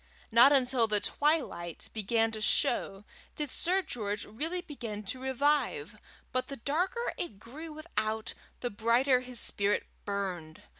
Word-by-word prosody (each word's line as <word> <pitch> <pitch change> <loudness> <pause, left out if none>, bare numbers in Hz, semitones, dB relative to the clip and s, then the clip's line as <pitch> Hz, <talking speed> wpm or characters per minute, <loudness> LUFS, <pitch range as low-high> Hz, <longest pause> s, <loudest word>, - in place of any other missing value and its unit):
Not 235 +5 +8
until 255 -4 +4
the 210 -1 +2
twilight 275 - 0
began 225 +1 +1
to 215 -1 -5
show 195 -1 +1 0.3
did 295 -3 -3
Sir 375 +2 +2
George 210 - -3
really 320 +12 -2
begin 230 - -6
to 255 +6 -4
revive, 290 - +1 0.3
but 255 -1 -1
the 275 -2 -6
darker 355 - -1
it 225 - -4
grew 295 +10 -9
without, 220 -9 -2 0.3
the 245 - -2
brighter 240 +5 +3
his 250 -1 -6
spirit 205 -2 +1 0.2
burned. 185 -6 -4
245 Hz, 140 wpm, -31 LUFS, 210-295 Hz, 0.3 s, Not